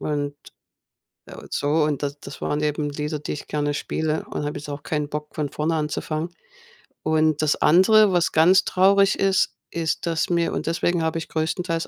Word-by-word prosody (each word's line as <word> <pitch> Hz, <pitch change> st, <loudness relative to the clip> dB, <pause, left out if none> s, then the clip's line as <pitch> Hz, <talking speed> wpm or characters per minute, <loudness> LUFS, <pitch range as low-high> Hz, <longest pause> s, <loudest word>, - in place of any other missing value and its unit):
Und 145 Hz, -1 st, -2 dB, 0.9 s
und -, -, -12 dB
so, 145 Hz, -, -1 dB, 0.2 s
und 150 Hz, -1 st, -2 dB
da 140 Hz, -, 0 dB
das -, -, -9 dB
waren 150 Hz, -, -1 dB
eben 150 Hz, 0 st, -1 dB
Lieder, 150 Hz, +1 st, -3 dB
die 150 Hz, -, -4 dB
ich 150 Hz, -, -8 dB
gerne 145 Hz, -1 st, -1 dB
spiele 155 Hz, +1 st, -2 dB
und -, -, -3 dB
da -, -, -2 dB
habe 145 Hz, -, -4 dB
ich 145 Hz, -, -9 dB
auch 145 Hz, 0 st, -5 dB
keinen 150 Hz, -2 st, -2 dB
Bock, 150 Hz, 0 st, -6 dB
von 150 Hz, -2 st, -2 dB
vorne 155 Hz, +2 st, -1 dB
anzufangen. 155 Hz, +1 st, -2 dB, 0.7 s
Und 155 Hz, -1 st, +2 dB
das 155 Hz, -1 st, +2 dB
andere, 200 Hz, +4 st, +5 dB
was 175 Hz, -1 st, +2 dB
ganz 175 Hz, +4 st, +5 dB
traurig 195 Hz, +1 st, +4 dB
ist, 195 Hz, -1 st, +2 dB, 0.2 s
ist, 165 Hz, 0 st, -2 dB
dass 165 Hz, +1 st, 0 dB
mir 170 Hz, -1 st, +1 dB
und -, -, -3 dB
deswegen 170 Hz, +1 st, 0 dB
habe 160 Hz, +1 st, -1 dB
ich 160 Hz, -, -8 dB
größtenteils 165 Hz, +1 st, -2 dB
155 Hz, 190 wpm, -23 LUFS, 150-170 Hz, 0.9 s, andere